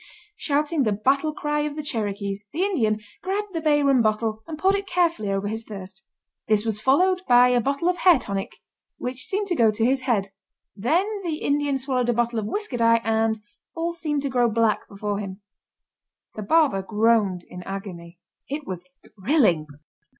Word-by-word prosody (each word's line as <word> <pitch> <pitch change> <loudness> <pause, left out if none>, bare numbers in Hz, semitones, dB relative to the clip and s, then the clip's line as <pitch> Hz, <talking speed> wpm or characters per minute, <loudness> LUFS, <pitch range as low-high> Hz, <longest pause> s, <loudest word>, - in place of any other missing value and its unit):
Shouting 300 -3 0
the 215 -5 +2
battle 275 +9 +1
cry 295 0 -2
of 295 0 -2
the 305 - -4
Cherokees, 205 -6 -3
the 345 - -1
Indian, 225 - +1 0.2
grabbed 395 +2 -3
the 330 - -2
bay 295 -2 +3
rum 275 -3 +4
bottle 220 0 0
and 320 -2 -6
poured 380 +5 +3
it 400 0 -2
carefully 340 - +1
over 195 +1 -1
his 220 +2 -4
thirst. 195 -3 -9 0.5
This 215 0 +2
was 215 -2 -1
followed 360 +10 +3
by 245 0 +6
a 245 -1 +3
bottle 280 +7 -1
of 360 0 +1
hair 350 -2 +6
tonic, 195 -5 -4 0.5
which 255 0 -2
seemed 405 +1 -1
to 350 - +1
go 230 -6 +4
to 220 +1 0
his 260 +2 +2
head. 220 -7 0 0.5
Then 305 - +1 0.2
the 330 -3 -2
Indian 285 -2 0
swallowed 255 -2 -1
a - - +3
bottle 235 0 0
of 210 - -3
whisker 410 - -3
dye 230 0 +4
and 225 0 +1 0.4
all 335 +1 -1
seemed 305 -4 -2
to 280 - -1
grow 245 -2 +2
black 225 -1 +1
before 205 0 -3
him. 195 0 -7 0.9
The 215 - -6
barber 275 -3 +3
groaned 210 -3 +1
in 180 - -9
agony. 180 -3 -7 0.3
It 290 +1 -4
was 180 -1 -6 0.3
thrilling. 190 - +2
240 Hz, 185 wpm, -24 LUFS, 210-300 Hz, 0.9 s, by